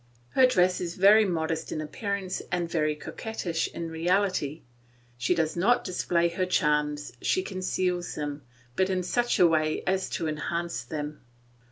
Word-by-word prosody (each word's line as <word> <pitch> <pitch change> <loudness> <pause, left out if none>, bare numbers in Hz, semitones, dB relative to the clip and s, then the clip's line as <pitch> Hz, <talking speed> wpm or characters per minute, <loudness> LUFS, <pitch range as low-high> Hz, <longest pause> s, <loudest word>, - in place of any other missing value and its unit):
Her 260 - +5
dress 180 -6 +2
is 175 -1 -4
very 210 +3 +6
modest 165 -3 -2
in - - -2
appearance 190 +4 -3
and 175 -1 0
very 155 -2 0
coquettish 170 0 -3
in 165 -1 -6
reality; 170 -2 0 0.5
she 120 +9 +1
does 160 -2 0
not 230 +8 +3
display 175 -2 +1
her 185 +2 -1
charms, 150 -5 +1
she 185 - +1
conceals 185 -2 -2
them, 145 -1 -4 0.3
but 190 0 +2
in 185 -1 0
such 240 +6 +1
a 180 - +6
way 155 -2 +2
as 190 0 0
to 165 - -2
enhance 170 +3 -3
them. 150 -1 -5
170 Hz, 155 wpm, -27 LUFS, 155-185 Hz, 0.5 s, very